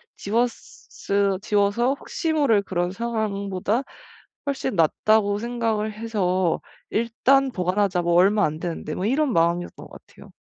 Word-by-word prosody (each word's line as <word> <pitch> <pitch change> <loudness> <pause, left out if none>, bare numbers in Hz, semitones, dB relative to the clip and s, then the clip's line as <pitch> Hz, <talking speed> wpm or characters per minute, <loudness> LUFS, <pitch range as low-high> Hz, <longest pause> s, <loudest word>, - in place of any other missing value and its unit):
지웠으 200 -3 -2
지워서 210 +5 +2
혹시 320 +3 -3
모를 265 -10 +3
그런 175 -2 -2
상황보다 210 0 -2 0.6
훨씬 265 -5 -2
낫다.'고 205 +5 +2
생각을 225 -2 -1
해서 190 -6 0 0.3
'일단 260 +4 +2
보관하자. 185 -2 0
뭐 170 0 +1
얼마 200 +4 +4
안되는데.' 155 0 -4
뭐 185 - -3
이런 270 +5 +1
마음이었던 170 0 0
것 - - -13
같아요. - - -16
205 Hz, 295 characters per minute, -23 LUFS, 185-235 Hz, 0.6 s, 얼마